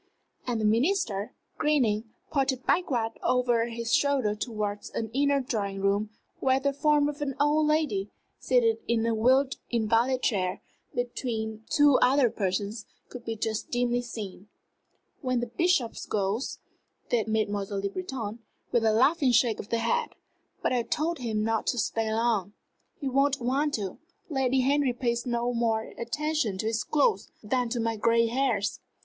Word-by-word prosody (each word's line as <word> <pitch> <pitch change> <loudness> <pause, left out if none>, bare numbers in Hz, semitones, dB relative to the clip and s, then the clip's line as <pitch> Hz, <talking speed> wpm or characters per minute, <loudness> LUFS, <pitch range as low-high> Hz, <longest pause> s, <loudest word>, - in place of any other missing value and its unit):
And 240 -2 0
the 215 - 0
Minister, 230 - +1 0.2
grinning, 240 -8 +2 0.3
pointed 270 -3 0
backward 245 -11 +1
over 245 -2 +2
his 230 0 -3
shoulder 275 -7 +2
towards 210 -2 -4
an 225 -1 -4
inner 280 +1 +2
drawing 205 -7 -3
room, 200 +2 +1 0.3
where 265 0 +3
the 280 +1 0
form 295 0 +3
of 295 0 -5
an 275 -2 -2
old 300 +1 +3
lady, 295 -11 +1 0.3
seated 235 -3 +3
in 230 -1 +1
a 230 - +1
wheeled 260 +5 +3
invalid 235 +3 +1
chair 185 -5 0 0.3
between 225 -3 -3
two 290 -3 +5
other 255 -2 +4
persons, 200 +2 -2 0.2
could 245 -1 -9
be 225 - -3
just 220 0 -3
dimly 245 0 +1
seen. 210 -5 -7 0.7
"When 255 -3 0
the 240 - -1
Bishop 265 0 +1 0.2
goes," 205 +5 -1 0.5
said 225 -3 +2
Mademoiselle 205 -2 -1
Le 200 - -1
Breton, 250 - -5 0.3
with 235 - +2
a 220 -1 +3
laughing 270 +4 +4
shake 230 -1 +3
of 205 - -7
the 230 - +1
head. 470 - 0 0.5
"But - - +1
I 245 - +2
told 315 +6 -1
him 220 -3 -1
not 225 0 0
to 245 - +1
stay 220 0 0
long." 220 -3 0 0.5
"He 280 - -3
won't 275 +1 +2
want 275 +5 0
to. 195 -4 -5 0.3
Lady 265 -2 +2
Henry 275 0 +2
pays 240 -1 -1
no 240 0 0
more 225 -2 0
attention 245 -3 -1
to 205 - -3
his 225 +1 0
cloth 365 +9 +1
than 245 +3 0
to 240 +1 -2
my 225 -1 -1
gray 230 +2 +3
hairs. 230 -4 0
235 Hz, 160 wpm, -28 LUFS, 220-270 Hz, 0.7 s, two